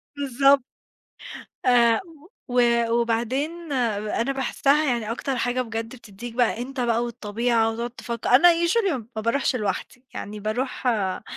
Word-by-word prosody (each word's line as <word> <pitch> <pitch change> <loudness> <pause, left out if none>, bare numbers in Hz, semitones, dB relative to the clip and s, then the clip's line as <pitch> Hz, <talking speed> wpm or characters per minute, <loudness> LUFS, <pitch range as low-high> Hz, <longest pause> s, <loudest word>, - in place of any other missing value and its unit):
بالضبط. 275 0 +3 1.0
آآ 235 -2 +5 0.5
و 245 0 +3 0.3
وبعدين 255 +8 -1 0.3
أنا 230 +5 -1
باحسها، 275 +3 +1
يعني 235 -5 -1
أكتر 265 +3 -3
حاجة 245 +2 0
بجد 225 0 -5
بتديك 230 0 -10
بقى 240 -1 +1
أنت 270 +2 -6
بقى 235 -1 +1
والطبيعة 230 0 0
وتقعد 235 +2 -4
تفكر، 235 -1 -5
أنا 275 +8 +7 0.2
Usually 400 +1 +2
م 230 -5 -5
ما 220 - -2
باروحش 255 +3 0
لوحدي، 220 +4 -4
يعني 210 +1 -6
باروح 245 +5 -3
آآ 200 -6 0
240 Hz, 135 wpm, -24 LUFS, 225-265 Hz, 1.0 s, أنا